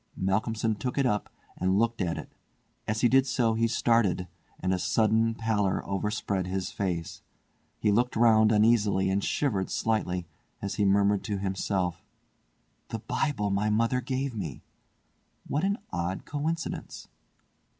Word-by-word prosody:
Malcolmson 110 Hz, +4 st, 0 dB
took 125 Hz, +5 st, -4 dB
it 140 Hz, -, +3 dB
up 105 Hz, -4 st, 0 dB, 0.3 s
and 95 Hz, +2 st, +1 dB
looked 115 Hz, 0 st, +1 dB
at 85 Hz, -3 st, -1 dB
it. -, -, -8 dB, 0.6 s
As 110 Hz, +1 st, -1 dB
he 120 Hz, -, +6 dB
did 135 Hz, +2 st, +4 dB
so 120 Hz, -3 st, +2 dB
he 115 Hz, +1 st, +2 dB
started, 110 Hz, -6 st, +2 dB, 0.3 s
and 95 Hz, +1 st, 0 dB
a 90 Hz, -, 0 dB
sudden 110 Hz, +4 st, +2 dB
pallor 110 Hz, -4 st, 0 dB
overspread 100 Hz, -1 st, -2 dB
his 95 Hz, 0 st, -3 dB
face. 90 Hz, -4 st, -3 dB, 0.6 s
He 105 Hz, -, +2 dB
looked 120 Hz, +4 st, +1 dB
round 110 Hz, -1 st, +5 dB
uneasily 105 Hz, -3 st, +3 dB
and 100 Hz, +1 st, 0 dB
shivered 105 Hz, -10 st, 0 dB
slightly, 90 Hz, -6 st, -1 dB, 0.3 s
as 100 Hz, -, -3 dB
he 105 Hz, -, +1 dB
murmured 100 Hz, 0 st, +3 dB
to 105 Hz, -3 st, -2 dB
himself: 95 Hz, -2 st, -2 dB, 0.8 s
"The 115 Hz, -, -4 dB
Bible 105 Hz, -2 st, -1 dB
my 100 Hz, +2 st, +1 dB
mother 115 Hz, +4 st, +2 dB
gave 135 Hz, 0 st, -2 dB
me! 90 Hz, -, -5 dB, 0.8 s
What 145 Hz, +4 st, -1 dB
an 200 Hz, +2 st, +1 dB
odd 85 Hz, +1 st, -3 dB
coincidence." 160 Hz, +3 st, -4 dB
105 Hz, 145 wpm, -28 LUFS, 95-115 Hz, 0.8 s, he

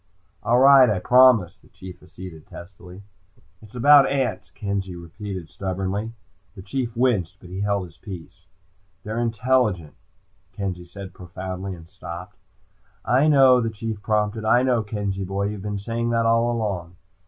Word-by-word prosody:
"All 115 Hz, +3 st, +2 dB
right, 135 Hz, -1 st, +7 dB
I 105 Hz, -, +1 dB
promise," 125 Hz, -4 st, +4 dB
the -, -, -23 dB
Chief 95 Hz, -1 st, -12 dB
acceded 90 Hz, -3 st, -11 dB
testily. 90 Hz, +1 st, -12 dB, 0.6 s
"It's 110 Hz, +2 st, -16 dB
about 140 Hz, +3 st, +6 dB
ants," 125 Hz, -8 st, -2 dB
Kenzie 100 Hz, -3 st, -4 dB
repeated 90 Hz, +1 st, -7 dB
stubbornly. 95 Hz, +5 st, -4 dB, 0.4 s
The 95 Hz, -, -10 dB
Chief 120 Hz, +2 st, -4 dB
winced, 105 Hz, -8 st, +1 dB
but 90 Hz, -, -14 dB
he 95 Hz, +2 st, -4 dB
held 100 Hz, -2 st, 0 dB
his 85 Hz, -2 st, -16 dB
peace. 90 Hz, -6 st, -11 dB, 0.6 s
"They're 110 Hz, +2 st, -4 dB
intelligent," 115 Hz, -, 0 dB, 0.6 s
Kenzie 90 Hz, -3 st, -5 dB
said 95 Hz, +1 st, -10 dB
profoundly, 95 Hz, +2 st, -6 dB
and 80 Hz, -1 st, -14 dB
stopped. 90 Hz, +4 st, -9 dB, 0.7 s
"I 130 Hz, +5 st, +3 dB
know," 135 Hz, -4 st, +6 dB
the 115 Hz, -, -1 dB
Chief 110 Hz, -1 st, -6 dB
prompted. 105 Hz, +1 st, -1 dB
"I 120 Hz, +3 st, +4 dB
know, 125 Hz, -3 st, +2 dB
Kenzie 100 Hz, -2 st, -3 dB
boy. 100 Hz, +2 st, -2 dB
You've 105 Hz, -2 st, -6 dB
been 105 Hz, 0 st, -4 dB
saying 115 Hz, +3 st, -3 dB
that 115 Hz, -1 st, +1 dB
all 115 Hz, +1 st, +3 dB
along." 95 Hz, -7 st, -3 dB
100 Hz, 155 wpm, -23 LUFS, 95-115 Hz, 0.7 s, right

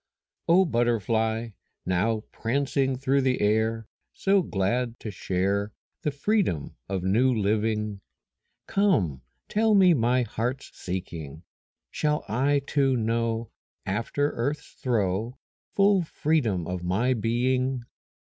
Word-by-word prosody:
O 185 Hz, +3 st, +5 dB
butterfly, 115 Hz, -, 0 dB, 0.4 s
now 100 Hz, +5 st, +1 dB
prancing 135 Hz, +2 st, 0 dB
Through 135 Hz, +1 st, +2 dB
the 130 Hz, -1 st, +1 dB
air, 110 Hz, +2 st, +1 dB, 0.3 s
So 195 Hz, 0 st, +3 dB
glad 120 Hz, -, -1 dB
to 110 Hz, -, -5 dB
share 100 Hz, +2 st, -1 dB, 0.3 s
The -, -, 0 dB
freedom 145 Hz, -, 0 dB
of 95 Hz, -2 st, -2 dB
new 115 Hz, +8 st, +3 dB
living, 105 Hz, -1 st, 0 dB, 0.6 s
Come, 125 Hz, -, +1 dB, 0.3 s
tell 215 Hz, 0 st, +3 dB
me 185 Hz, -3 st, +6 dB
my 125 Hz, -1 st, +2 dB
heart's 120 Hz, +4 st, -3 dB
seeking. 85 Hz, -5 st, -6 dB, 0.5 s
Shall 150 Hz, 0 st, 0 dB
I 140 Hz, +5 st, +1 dB
too 135 Hz, -3 st, +2 dB
know 115 Hz, 0 st, -1 dB, 0.3 s
After 115 Hz, +9 st, -1 dB
earth's 140 Hz, +6 st, -3 dB
throe 115 Hz, 0 st, -1 dB, 0.4 s
Full 200 Hz, -1 st, +4 dB
freedom 145 Hz, -, 0 dB
of 90 Hz, 0 st, -4 dB
my 100 Hz, +9 st, +1 dB
being? 125 Hz, +3 st, 0 dB
115 Hz, 110 wpm, -26 LUFS, 105-140 Hz, 0.6 s, me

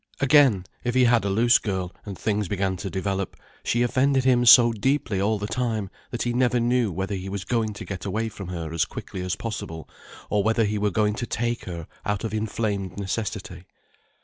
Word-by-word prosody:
Again, 135 Hz, -9 st, +5 dB, 0.2 s
if 120 Hz, 0 st, -1 dB
he 130 Hz, -, +5 dB
had 120 Hz, -3 st, +4 dB
a -, -, +1 dB
loose 115 Hz, +5 st, +4 dB
girl, 95 Hz, -4 st, -3 dB
and 100 Hz, -3 st, -6 dB
things 105 Hz, -2 st, -1 dB
began 95 Hz, 0 st, -1 dB
to 95 Hz, +2 st, -5 dB
develop, 95 Hz, -1 st, -2 dB, 0.3 s
she 120 Hz, +1 st, +1 dB
offended 130 Hz, +2 st, +2 dB
him 125 Hz, -2 st, +3 dB
so 120 Hz, +1 st, +9 dB
deeply 115 Hz, -3 st, 0 dB
all 105 Hz, +2 st, +1 dB
the 105 Hz, -, -4 dB
time, 110 Hz, -3 st, -2 dB, 0.2 s
that 120 Hz, -, -3 dB
he 120 Hz, -, -1 dB
never 125 Hz, 0 st, +2 dB
knew 120 Hz, -2 st, +2 dB
whether 95 Hz, +4 st, -3 dB
he 95 Hz, 0 st, -4 dB
was 100 Hz, -1 st, -4 dB
going 110 Hz, -2 st, 0 dB
to 105 Hz, -, -8 dB
get 95 Hz, -2 st, -6 dB
away 110 Hz, +3 st, -1 dB
from 100 Hz, -4 st, -8 dB
her 85 Hz, -3 st, -5 dB
as 85 Hz, -, +2 dB
quickly 95 Hz, -, -7 dB
as 90 Hz, -1 st, -2 dB
possible, 100 Hz, -8 st, -6 dB, 0.4 s
or 105 Hz, -, +1 dB
whether 110 Hz, +1 st, +2 dB
he 105 Hz, 0 st, -1 dB
were 105 Hz, 0 st, +2 dB
going 105 Hz, +1 st, +1 dB
to 120 Hz, +3 st, -4 dB
take 120 Hz, +2 st, -2 dB
her 85 Hz, -3 st, -6 dB, 0.2 s
out 105 Hz, 0 st, -2 dB
of 110 Hz, -2 st, -3 dB
inflamed 105 Hz, -3 st, -2 dB
necessity. 100 Hz, -2 st, -4 dB
105 Hz, 205 wpm, -25 LUFS, 95-120 Hz, 0.4 s, so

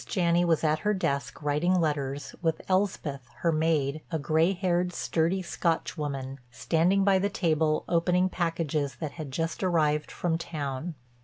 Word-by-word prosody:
Janney 175 Hz, -3 st, +2 dB
was 165 Hz, -2 st, +2 dB
at 155 Hz, 0 st, +2 dB
her 210 Hz, 0 st, +1 dB
desk 140 Hz, -6 st, -2 dB
writing 160 Hz, +6 st, +2 dB
letters, 145 Hz, -3 st, -2 dB
with 165 Hz, -2 st, 0 dB
Elspeth, 170 Hz, -9 st, -1 dB
her 170 Hz, -, +3 dB
maid, 155 Hz, -2 st, +1 dB
a 165 Hz, -, -1 dB
gray 160 Hz, +4 st, +2 dB
haired, 180 Hz, -1 st, 0 dB
sturdy 170 Hz, +3 st, 0 dB
Scotch 170 Hz, -1 st, -1 dB
woman, 140 Hz, -3 st, -4 dB
standing 165 Hz, -, +2 dB
by 195 Hz, -1 st, +4 dB
the 200 Hz, +2 st, +1 dB
table 160 Hz, -5 st, +1 dB
opening 180 Hz, +2 st, +2 dB
packages 165 Hz, -5 st, -1 dB
that 155 Hz, -3 st, -5 dB
had 155 Hz, -4 st, -7 dB
just 165 Hz, +5 st, -3 dB
arrived 150 Hz, -4 st, +2 dB
from 165 Hz, -2 st, -1 dB
town. 155 Hz, -1 st, -4 dB
165 Hz, 155 wpm, -28 LUFS, 150-175 Hz, -, by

